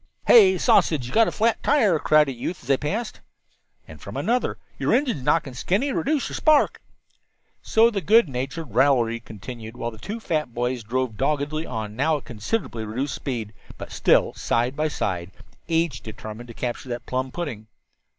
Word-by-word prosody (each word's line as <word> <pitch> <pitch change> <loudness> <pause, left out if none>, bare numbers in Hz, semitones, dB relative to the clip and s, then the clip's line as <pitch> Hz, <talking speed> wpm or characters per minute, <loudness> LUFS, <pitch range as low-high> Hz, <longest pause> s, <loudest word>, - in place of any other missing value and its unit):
"Hey, 190 -5 +7
Sausage, 155 -5 +3
you've 125 - -8
got 225 0 +5
a - - -1
flat 225 +1 +1
tire," 220 - +3
cried 155 0 +4
a - - -2
youth 130 +8 -5
as - - -15
they 135 - +4
passed. 210 - -4 0.7
And - - -12
from - - -7
another: 245 +2 0 0.2
"Your - - +2
engine's 250 - 0
knocking, 135 0 +1
Skinny. 195 - 0
Reduce 290 0 0
your - - -6
spark." 310 -2 +3 0.8
So 225 +1 +4
the 200 -3 -2
good 220 +4 +5
natured 135 +1 -5
raillery 120 -3 +3
continued 115 +1 -9
while 120 -1 -3
the 110 - -13
two 215 - -5
fat 155 - -2
boys 125 +1 -1
drove 120 0 -2
doggedly 150 +3 -1
on, 110 -1 -5
now 150 +5 +2
at 145 - -12
considerably 120 - -3
reduced 125 +6 -3
speed, 115 -6 -4 0.2
but - - -8
still - - +3
side 120 +3 0
by 155 +1 0
side, 90 - -3 0.4
each 165 -7 0
determined 110 +2 -8
to 115 - -11
capture 125 +1 -4
that 120 0 -5
plum 130 0 -2
pudding. 125 -11 -5
135 Hz, 180 wpm, -24 LUFS, 120-175 Hz, 0.8 s, Hey